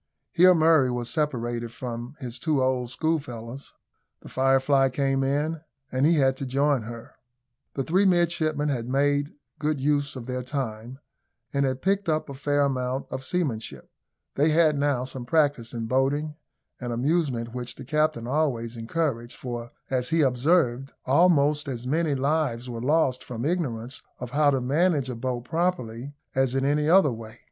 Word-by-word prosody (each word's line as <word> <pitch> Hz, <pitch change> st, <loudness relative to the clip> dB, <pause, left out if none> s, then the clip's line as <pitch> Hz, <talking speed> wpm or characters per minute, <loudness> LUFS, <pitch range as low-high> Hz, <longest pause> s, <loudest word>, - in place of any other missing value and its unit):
Here 180 Hz, +1 st, +6 dB
Murray 160 Hz, -5 st, +4 dB
was 120 Hz, -1 st, -3 dB
separated 120 Hz, -6 st, -2 dB
from 120 Hz, +2 st, -6 dB
his 125 Hz, -3 st, -6 dB
two 150 Hz, +1 st, +1 dB
old 130 Hz, -2 st, 0 dB
schoolfellows. 130 Hz, -4 st, -4 dB, 0.5 s
The -, -, -12 dB
Firefly 135 Hz, +1 st, +3 dB
came 135 Hz, +1 st, 0 dB
in, 150 Hz, +4 st, 0 dB, 0.3 s
and 130 Hz, +3 st, +2 dB
he 170 Hz, -, +4 dB
had 135 Hz, -3 st, +3 dB
to 135 Hz, -, -4 dB
join 140 Hz, 0 st, +2 dB
her. 115 Hz, +1 st, -9 dB, 0.6 s
The 135 Hz, -, -1 dB
three 185 Hz, +8 st, +2 dB
midshipmen 165 Hz, -5 st, +2 dB
had 120 Hz, -3 st, -2 dB
made 145 Hz, +2 st, +1 dB, 0.3 s
good 150 Hz, -1 st, 0 dB
use 145 Hz, 0 st, 0 dB
of 125 Hz, -3 st, -7 dB
their 125 Hz, 0 st, -3 dB
time, 125 Hz, -2 st, -5 dB, 0.6 s
and 140 Hz, -1 st, +2 dB
had 130 Hz, 0 st, -3 dB
picked 195 Hz, 0 st, +1 dB
up 155 Hz, -1 st, 0 dB
a -, -, -5 dB
fair 145 Hz, +1 st, 0 dB
amount 130 Hz, -1 st, -1 dB
of 130 Hz, -, -4 dB
seamanship. 135 Hz, -9 st, -3 dB, 0.4 s
They 150 Hz, +3 st, +3 dB
had 155 Hz, -1 st, +4 dB
now 140 Hz, -3 st, +1 dB
some 130 Hz, -1 st, -6 dB
practice 145 Hz, -3 st, +1 dB
in 115 Hz, -2 st, -4 dB
boating, 140 Hz, +5 st, 0 dB, 0.4 s
an 120 Hz, -1 st, -4 dB
amusement 125 Hz, -2 st, 0 dB
which 125 Hz, -1 st, -5 dB
the 135 Hz, -, -10 dB
captain 150 Hz, -3 st, 0 dB
always 125 Hz, -4 st, -1 dB
encouraged; 120 Hz, 0 st, -2 dB
for, 120 Hz, -2 st, -6 dB, 0.2 s
as 125 Hz, -1 st, 0 dB
he 165 Hz, 0 st, +2 dB
observed, 135 Hz, 0 st, +2 dB
almost 150 Hz, 0 st, +3 dB
as 125 Hz, -3 st, -5 dB
many 155 Hz, +2 st, +1 dB
lives 135 Hz, -3 st, 0 dB
were 115 Hz, -2 st, -5 dB
lost 135 Hz, -2 st, +2 dB
from 120 Hz, 0 st, -5 dB
ignorance 130 Hz, -8 st, -2 dB, 0.2 s
of 125 Hz, -1 st, -7 dB
how 145 Hz, +2 st, +4 dB
to 135 Hz, -2 st, +1 dB
manage 145 Hz, 0 st, +1 dB
a -, -, -5 dB
boat 125 Hz, +1 st, -3 dB
properly, 145 Hz, -5 st, -2 dB, 0.2 s
as 130 Hz, -1 st, +1 dB
in 135 Hz, 0 st, +1 dB
any 150 Hz, +2 st, +2 dB
other 180 Hz, -5 st, +6 dB
way. 115 Hz, 0 st, -9 dB
135 Hz, 165 wpm, -26 LUFS, 125-150 Hz, 0.6 s, Here